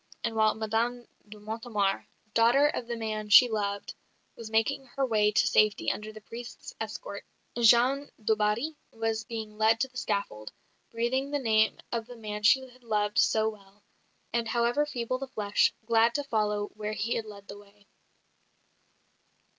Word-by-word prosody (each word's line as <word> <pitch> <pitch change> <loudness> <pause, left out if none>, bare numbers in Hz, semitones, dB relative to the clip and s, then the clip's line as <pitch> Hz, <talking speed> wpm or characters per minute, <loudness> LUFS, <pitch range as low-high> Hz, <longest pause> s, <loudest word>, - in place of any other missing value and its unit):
And 225 - -2
while 220 -1 +3
Madame 225 +2 -1 0.2
de 210 - -10
Mortemart, 215 -2 -2 0.3
daughter 235 +5 +5
of 250 -5 -1
the 240 - -3
man 215 -2 -4
she 245 +5 +9
loved, 200 -3 -3 0.4
was 230 -2 -8
making 245 +5 0
her 275 -1 +1
way 210 -3 +2
to 200 +3 +3
safety 215 -1 +3
under 215 0 -6
the 215 0 -12
priest's 240 - -9
escort, - - -6 0.3
Jeanne 245 +4 +4
du 220 0 +1
Barry 215 +8 0 0.2
was 225 0 -2
being 220 -2 -7
led 220 +1 +4
to 265 - +1
the 255 -1 -13
scaffold, 110 - -3 0.4
breathing 245 +4 -1
the 290 - 0
name 220 -5 +2
of 230 -1 -3
the 245 -1 -11
man 210 -2 -6
she 230 +5 +5
had 250 0 -21
loved 210 -2 0
so 220 0 +3
well; 200 -1 -9 0.5
and, 235 -1 0
however 240 +6 +1
feeble 255 -2 -3
the 270 - -5
flesh, 210 -5 +1
glad 230 +1 +3
to 290 - 0
follow 210 -5 -1
where 210 0 -4
he 220 +2 -1
had 225 - -2
led 200 -1 -12
the 205 - -9
way. 205 0 -21
225 Hz, 170 wpm, -28 LUFS, 210-240 Hz, 0.5 s, she